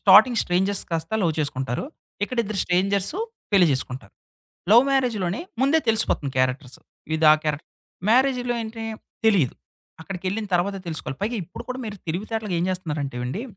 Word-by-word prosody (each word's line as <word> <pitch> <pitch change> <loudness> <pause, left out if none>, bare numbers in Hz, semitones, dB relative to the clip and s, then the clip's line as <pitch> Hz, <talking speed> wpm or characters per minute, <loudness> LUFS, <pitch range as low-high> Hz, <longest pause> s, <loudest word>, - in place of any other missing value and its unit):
Starting 215 +4 +7
strangers 190 +3 +1
కాస్త 165 +3 -2
love 170 -3 +2
చేసుకుంటారు. 130 - -2 0.4
ఇక్కడి 240 +3 -1
ఇద్దరు 210 -1 -4
స్ట్రేంజర్స్ 195 - +1 0.4
పెళ్లి 190 -3 +6
చేసుకుంటారు. 125 -5 -4 0.6
లవ్ 235 +3 +9
మ్యారేజ్‌లోనే 230 -8 0 0.2
ముందే 280 +4 +4
తెలిసిపోతుంది 215 -10 +2
క్యారెక్టర్స్. 130 0 -1 0.4
ఇదా 160 -1 +6
ఆ - - +1
క్యారెక్టర్. 150 -1 -2 0.4
మ్యారేజ్‌లో 250 0 +3
ఏంటి 225 0 -7 0.4
తెలీదు. 185 - +3 0.5
అక్కడికెళ్ళిన 190 +5 -4
తర్వాతే 195 +3 +1
తెలుసుకోవాలి. 160 -5 -4
పైగా 230 +4 -1
ఇప్పుడు 170 - -9
కూడా 255 0 -4
మీరు 210 -2 -5
తెలివితేటగా 210 +4 -3
ఏం 170 - 0
జేస్తున్నారంటేవండి, 150 - -3
190 Hz, 135 wpm, -24 LUFS, 155-220 Hz, 0.6 s, లవ్